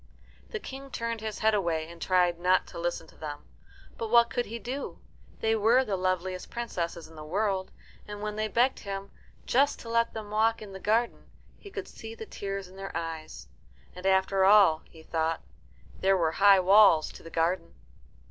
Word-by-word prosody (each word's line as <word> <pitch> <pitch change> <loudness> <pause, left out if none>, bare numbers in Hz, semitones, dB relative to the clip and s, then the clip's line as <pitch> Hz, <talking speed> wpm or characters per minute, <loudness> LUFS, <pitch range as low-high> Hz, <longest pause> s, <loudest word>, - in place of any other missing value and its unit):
The 455 - -3
King 275 -6 -9
turned 230 -3 -3
his 220 -1 -4
head 220 - +5
away 170 -6 0
and 170 0 -12
tried 180 -2 +2
not 180 +1 +3
to - - -8
listen 170 -1 -2
to - - -19
them. 145 -2 -7 0.5
But 225 - -3
what 235 0 +5
could 245 0 -1
he 230 +3 -5
do? 255 +4 -5 0.4
They 225 0 +2
were 230 +5 +4
the 205 -4 -1
loveliest 185 0 -2
princesses 170 -8 -4
in 160 - -16
the 155 - -8
world, 190 +3 -1 0.4
and 205 0 -7
when 210 0 -4
they 215 0 -1
begged 240 +5 +2
him 195 -1 -6 0.3
just 280 +3 +3
to 230 - -9
let 230 0 +1
them 215 -2 -6
walk 225 +2 +2
in 205 -2 -10
the 190 - -7
garden 225 +4 0 0.3
he 405 - -11
could - - -6
see 225 0 -9
the 220 - -8
tears 195 -2 -5
in 185 +1 -15
their 195 -3 -5
eyes. 160 - -6 0.5
And 180 +1 -4
after 190 0 +3
all, 195 -5 +6
he 160 -1 -15
thought, 160 0 -1 0.6
there 195 0 +3
were 165 -3 +1
high 195 +2 +6
walls 190 -4 +6
to - - -13
the 165 - -10
garden. 165 +1 -1
195 Hz, 195 wpm, -28 LUFS, 175-225 Hz, 0.6 s, all